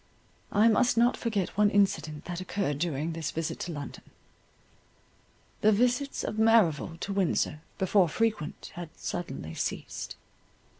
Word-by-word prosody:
I 210 +3 +5
must 235 +2 +3
not 240 +2 +4
forget 210 -6 -1
one 210 0 +4
incident 190 -7 +1
that 175 0 -4
occurred 185 -6 -2
during 160 -1 -1
this 160 -2 -3
visit 165 -1 -3
to 175 - -4
London. 145 -4 -7 1.6
The 215 - +5
visits 250 +6 +1
of 215 - -3
Merrival 195 -8 +4
to 200 - -2
Windsor, 175 -5 0 0.2
before 190 -2 +3
frequent, 215 -6 -2
had 175 -2 -7
suddenly 135 - -5
ceased. - - -4
190 Hz, 135 wpm, -29 LUFS, 160-215 Hz, 1.6 s, I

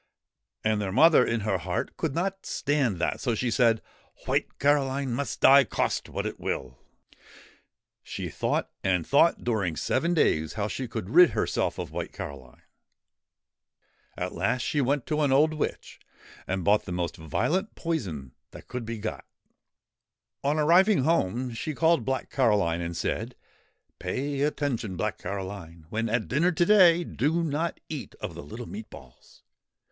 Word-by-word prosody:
And 110 -1 +1
their 95 -2 -2
mother, 155 - +6
in 115 -1 -1
her 100 -3 0
heart, 90 +1 -3
could 155 -5 -2
not 195 +3 -2
stand 140 -8 0
that, 85 - -1
so 120 -4 0
she 120 +2 -1
said: 115 -2 +3 0.2
' - - -27
White - - -1
Caroline 140 -2 +1
must 140 +4 -3
die, 140 +1 +8
cost 110 - -2
what - - -3
it - - -4
will/' 65 -1 -4 1.2
She - - -6
thought - - -2
and 90 -3 +1
thought 165 +4 +3
during 100 -9 0
seven 165 - 0
days 80 - +2
how 105 -1 -2
she 130 +4 -4
could 110 -3 -5
rid 175 +2 +8
herself - - 0
of - - -5
White - - -5
Caroline. 65 -3 -9 1.5
At 90 0 -3
last 100 +8 0
she 145 - 0
went 140 +1 0
to 155 -1 -1
an 145 -2 +2
old 150 +4 +4
witch, 155 - -4 0.5
and 95 -1 -2
bought 105 +3 +3
the 90 - -6
most 90 -1 -2
violent 125 - -1
poison 90 - -3 0.2
that - - -13
could 125 -2 -5
be 115 0 -4
got. 110 +1 -5 1.2
On 145 +2 +1
arriving 175 +3 +4
home 125 - 0
she 130 +6 -4
called 165 +2 +3
Black 130 -2 -2
Caroline 100 -10 +2
and 85 0 -4
said: 115 +7 -3 0.3
' - - -46
Pay 135 +10 -2
attention, 140 -10 -1
Black - - -2
Caroline; 95 -4 -6
when 115 +1 -1
at 115 0 0
dinner 165 +7 +2
to 175 0 +2
day, 175 -4 +6
do 160 +4 0
not 160 +2 -2
eat 150 -4 -7
of - - -6
the - - -8
little 110 - -8
meat 110 +1 -8
balls. 60 -2 -16
125 Hz, 165 wpm, -27 LUFS, 95-150 Hz, 1.5 s, die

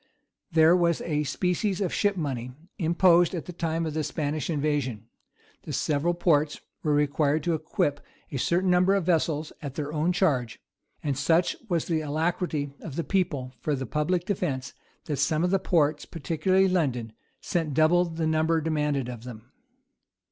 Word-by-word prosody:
[v] 170 - -19
There 160 +2 +6
was 170 -2 +2
a 150 -2 -1
species 180 +6 -1
of 190 -4 -1
ship 205 -2 +1
money 125 -6 -3 0.3
imposed 175 +1 +4
at 165 - -4
the 180 - -7
time 165 -1 -1
of 155 - -3
the 155 0 -1
Spanish 150 +1 -2
invasion: 145 -8 -1 0.6
the - - -8
several 155 +3 0
ports 155 -4 +2 0.2
were 150 -2 +1
required 145 +1 +1
to 170 - +1
equip 155 -2 -1 0.3
a 140 - -3
certain 180 +6 +2
number 180 +2 +4
of 195 - +1
vessels 160 -3 0
at 140 -2 -6
their 150 0 -4
own 160 +3 +1
charge: 140 - 0 0.4
and 145 -2 0
such 160 +6 +2
was 170 -3 0
the 160 -2 0
alacrity 155 -1 -1
of 145 - -8
the 170 - -1
people 150 -10 -1
for 150 +3 -1
the 130 -1 -4
public 160 +6 0
defence, 145 - -2 0.3
that 145 - -2
some 155 +3 +1
of 180 - +1
the 195 - +3
ports, 155 -5 +1
particularly 175 +4 +1
London, 130 - 0 0.3
sent 160 -6 -2
double 160 +3 +4
the 165 -1 -3
number 160 +1 +2
demanded 150 -4 -1
of 120 -2 -7
them. 120 0 -10
155 Hz, 170 wpm, -27 LUFS, 145-175 Hz, 0.6 s, There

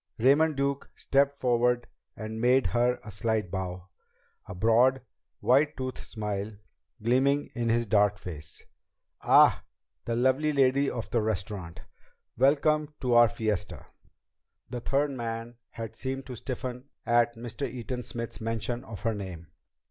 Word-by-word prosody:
Raymond 145 +6 +4
Duke 140 0 -1
stepped 140 +1 +1
forward 120 -1 +2 0.3
and 110 0 -5
made 130 +2 +4
her 120 +1 +1
a 105 - -9
slight 110 -3 -1
bow, 90 -1 -5 0.6
a - - -7
broad 120 +6 +4 0.4
white 145 +4 +3
toothed 130 -1 -4
smile 105 -1 -3 0.5
gleaming 135 +5 +2
in 120 -1 -1
his 120 +1 +2
dark 105 -1 +3
face. 80 -6 -8 0.6
"Ah! - - +6 0.4
The 115 - -1
lovely 130 +5 +2
lady 135 0 +3
of 120 - -5
the 120 - +2
restaurant! 95 -5 -4 0.5
Welcome 150 +3 +2
to 125 -2 +1
our 120 0 +8
fiesta!" 110 -3 -3 0.9
The 125 - -3
third 140 +4 0
man 115 -2 -5
had 115 -1 -7
seemed 135 +2 -4
to 130 - -7
stiffen 125 +1 -5 0.2
at 120 0 +3
Mr. 120 +3 -5
Eaton 125 0 -5
Smith's 115 -1 -6
mention 115 +2 -2
of 110 -3 -9
her 115 -1 +1
name. 90 -5 -7
120 Hz, 140 wpm, -28 LUFS, 110-130 Hz, 0.9 s, our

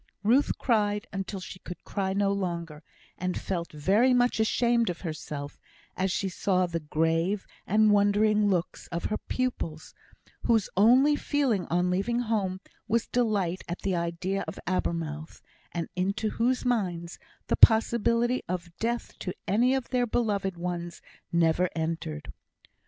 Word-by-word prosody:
Ruth 245 +7 +3
cried 210 -4 +1
until 195 0 -4
she 185 0 -9
could 180 -1 -9
cry 190 -2 -2
no 200 0 +2
longer, 170 -6 -3 0.4
and 180 0 -2
felt 175 -3 -3
very 200 - +3
much 245 -2 +2
ashamed 235 +1 +2
of 175 - -4
herself 150 -4 -6 0.4
as 190 0 0
she 195 - -1
saw 185 0 +1
the 170 -1 -3
grave 165 +5 0 0.2
and 215 +2 +4
wondering 205 +1 +3
looks 180 -3 -2
of 170 0 -4
her - - -1
pupils, 170 -11 -3 0.5
whose 225 -4 +2
only 255 +9 +6
feeling 270 - 0
on 180 +2 +1
leaving 210 +6 0
home 200 -5 -1 0.3
was 230 +1 +1
delight 205 -7 0
at 175 - -5
the 190 -2 0
idea 170 +3 -2
of - - -6
Abermouth, 165 -4 -2 0.3
and 170 -2 -3
into 200 +4 0
whose 250 +3 0
minds 180 -8 -1 0.3
the - - +1
possibility 235 +2 +4
of 170 -1 -4
death 235 +1 -2
to 180 - -4
any 240 +8 +3
of 265 -3 -3
their 250 -1 +1
beloved 205 -5 0
ones 175 0 -4 0.3
never 170 +1 +3
entered. 160 -3 -3
195 Hz, 145 wpm, -28 LUFS, 170-225 Hz, 0.5 s, only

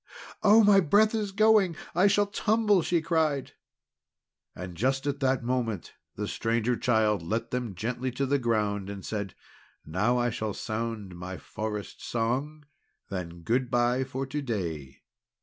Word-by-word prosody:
"Oh, 220 +1 +7
my 200 -1 +7
breath 205 +6 +4
is 210 -3 -1
going! 210 -4 +4 0.2
I 180 +4 +4
shall 205 +1 +3
tumble!" 210 -1 +2
she 170 -1 0
cried. 155 -4 0 1.0
And 90 -1 -7
just 135 +8 0
at 145 -1 -1
that 135 -3 +1
moment 120 -6 -2 0.2
the - - -3
Stranger 115 +2 0
Child 110 -5 +2
let 115 +7 -3
them 125 0 -1
down 100 - -9
gently 120 +6 -2
to 135 +2 -1
the 140 +1 +1
ground, 105 -5 0
and 100 -1 -7
said: 100 -4 -4 0.5
"Now 105 +10 +1
I 120 0 +1
shall 110 -2 -3
sound 110 -4 -4
my 90 +1 -6
Forest 105 0 -6
Song. 135 +7 -2 0.5
Then 85 -3 -5
good 125 +5 +1
bye 120 +2 +2
for 130 +1 -4
to 145 +3 -3
day." 85 - -4
120 Hz, 155 wpm, -28 LUFS, 105-150 Hz, 1.0 s, Oh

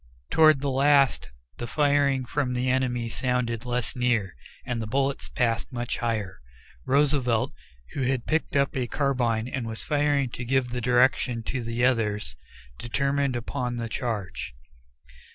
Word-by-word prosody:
Toward 155 -3 +6
the 140 -1 0
last, 140 0 +3 0.3
the 120 - -4
firing 140 -1 +2
from 125 0 -1
the 125 +1 +1
enemy 125 -2 0
sounded 125 -1 -1
less 125 0 -1
near, 120 - 0 0.3
and 120 -2 -2
the 110 - -4
bullets 135 +4 -1
passed 115 0 -1
much 120 -1 -3
higher. 110 -5 -2 0.5
Roosevelt, 135 -5 +2 0.4
who 140 - -3
had 130 -1 0
picked 160 -1 -1
up 140 -1 +2
a 125 -2 -1
carbine 120 -5 0
and 125 -2 -4
was 110 -1 -6
firing 145 -4 +1
to 125 - -6
give 130 0 +1
the 125 0 -3
direction 125 -1 +2
to 125 +2 -3
the 115 +1 0
others, 110 -4 0 0.4
determined 140 +2 0
upon 120 0 -3
a 115 - -3
charge. 110 - -4
125 Hz, 150 wpm, -26 LUFS, 115-140 Hz, 0.5 s, Toward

